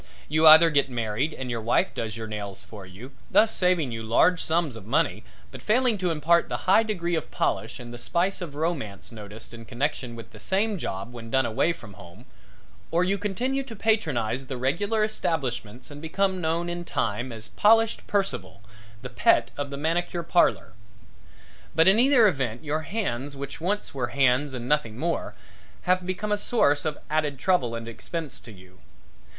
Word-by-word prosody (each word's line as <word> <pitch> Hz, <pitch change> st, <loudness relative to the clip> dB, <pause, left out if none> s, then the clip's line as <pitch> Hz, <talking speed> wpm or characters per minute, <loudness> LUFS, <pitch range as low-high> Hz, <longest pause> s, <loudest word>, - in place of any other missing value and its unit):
You 155 Hz, +2 st, +4 dB
either 160 Hz, +2 st, +9 dB
get 140 Hz, -2 st, +2 dB
married 120 Hz, +4 st, -1 dB
and 130 Hz, -4 st, -5 dB
your 115 Hz, -1 st, -3 dB
wife 115 Hz, +2 st, +1 dB
does 110 Hz, -1 st, -4 dB
your 110 Hz, -, -5 dB
nails 105 Hz, -3 st, -6 dB
for 100 Hz, -4 st, -11 dB
you, 105 Hz, +9 st, -11 dB, 0.2 s
thus 225 Hz, +1 st, +4 dB
saving 180 Hz, -7 st, +2 dB
you 115 Hz, 0 st, -4 dB
large 160 Hz, +11 st, +3 dB
sums 160 Hz, -5 st, +1 dB
of 110 Hz, -3 st, -11 dB
money, -, -, +1 dB, 0.3 s
but -, -, -10 dB
failing 235 Hz, -1 st, +2 dB
to 180 Hz, -1 st, 0 dB
impart 165 Hz, +2 st, +2 dB
the -, -, -4 dB
high 190 Hz, +4 st, +6 dB
degree 180 Hz, -6 st, -2 dB
of 160 Hz, -3 st, -2 dB
polish -, -, -2 dB
and 120 Hz, -1 st, -9 dB
the 120 Hz, -, -8 dB
spice 180 Hz, +10 st, -1 dB
of 160 Hz, -5 st, -6 dB
romance 135 Hz, -, -3 dB
noticed 110 Hz, +1 st, -10 dB
in 115 Hz, -1 st, -9 dB
connection 125 Hz, 0 st, -3 dB
with 115 Hz, -, -10 dB
the -, -, -13 dB
same 200 Hz, +1 st, 0 dB
job 100 Hz, -1 st, -5 dB
when 115 Hz, -1 st, -9 dB
done 130 Hz, +1 st, +2 dB
away 115 Hz, +9 st, +1 dB
from 110 Hz, -11 st, -10 dB
home, 95 Hz, +4 st, -14 dB, 0.6 s
or 170 Hz, +2 st, +2 dB
you 195 Hz, +2 st, 0 dB
continue 245 Hz, +7 st, -1 dB
to 260 Hz, -4 st, -9 dB
patronize 135 Hz, -, 0 dB
the 130 Hz, -, -4 dB
regular 200 Hz, -, 0 dB
establishments 130 Hz, -, -3 dB
and 145 Hz, 0 st, -9 dB
become 190 Hz, +3 st, 0 dB
known 165 Hz, +1 st, 0 dB
in 175 Hz, 0 st, -4 dB
time 120 Hz, -6 st, -2 dB
as 110 Hz, -1 st, -9 dB
Polished 225 Hz, +1 st, +3 dB
Percival, 195 Hz, -, -2 dB, 0.4 s
the 125 Hz, -, -5 dB
Pet 115 Hz, 0 st, +3 dB
of 145 Hz, -1 st, -4 dB
the 140 Hz, -, -6 dB
Manicure 170 Hz, +3 st, -1 dB
Parlor. 170 Hz, -8 st, +2 dB, 1.0 s
But 160 Hz, +2 st, +5 dB
in 195 Hz, +4 st, +6 dB
either 250 Hz, -3 st, +6 dB
event 130 Hz, -, -2 dB
your 155 Hz, +1 st, -1 dB
hands 145 Hz, -, -3 dB
which 140 Hz, +2 st, -7 dB
once 205 Hz, +5 st, -2 dB
were 130 Hz, -3 st, -2 dB
hands 135 Hz, +2 st, +2 dB
and 120 Hz, -1 st, -5 dB
nothing 130 Hz, -7 st, 0 dB
more, 165 Hz, +4 st, -2 dB, 0.5 s
have 185 Hz, 0 st, +1 dB
become 210 Hz, +3 st, -3 dB
a 210 Hz, -, +1 dB
source 145 Hz, -12 st, +2 dB
of 150 Hz, -2 st, -1 dB
added 150 Hz, -2 st, 0 dB
trouble 130 Hz, -7 st, +1 dB
and 115 Hz, 0 st, -6 dB
expense 150 Hz, +6 st, -5 dB
to 115 Hz, -, -13 dB
you. 95 Hz, -2 st, -17 dB
145 Hz, 185 wpm, -26 LUFS, 120-180 Hz, 1.0 s, either